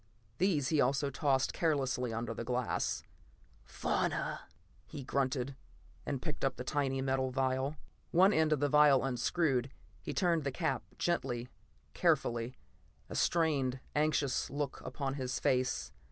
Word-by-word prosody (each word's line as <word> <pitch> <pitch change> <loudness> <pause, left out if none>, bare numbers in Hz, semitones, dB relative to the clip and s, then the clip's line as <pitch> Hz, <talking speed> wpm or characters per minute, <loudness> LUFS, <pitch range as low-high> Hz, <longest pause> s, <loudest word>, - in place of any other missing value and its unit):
These 160 -8 +2
he 155 -3 +3
also 140 +2 +1
tossed 135 -1 +1
carelessly 135 -6 0
under 115 +1 -3
the 115 - -5
glass. 125 0 -1 0.6
"Fauna," - - -1 0.5
he 145 -3 -7
grunted, 130 0 -1 0.5
and 135 -3 -2
picked 155 -3 -4
up 135 -1 +1
the 125 - -5
tiny 135 -1 0
metal 130 -1 +1
vial. 130 +2 0 0.3
One 190 +4 +5
end 160 -1 +3
of 150 -2 +2
the 145 - +3
vial 145 -2 +5
unscrewed. 135 +1 +1 0.3
He - - -4
turned 170 -4 +2
the 140 - -1
cap 155 +5 -1 0.2
gently, 125 -8 -1 0.4
carefully, 120 +1 +1 0.5
a - - -6
strained, 140 -6 +1 0.2
anxious 150 -3 +1
look 140 -1 -3
upon 135 +1 -3
his 130 -2 -3
face. 130 -1 +1
135 Hz, 140 wpm, -33 LUFS, 130-150 Hz, 0.6 s, One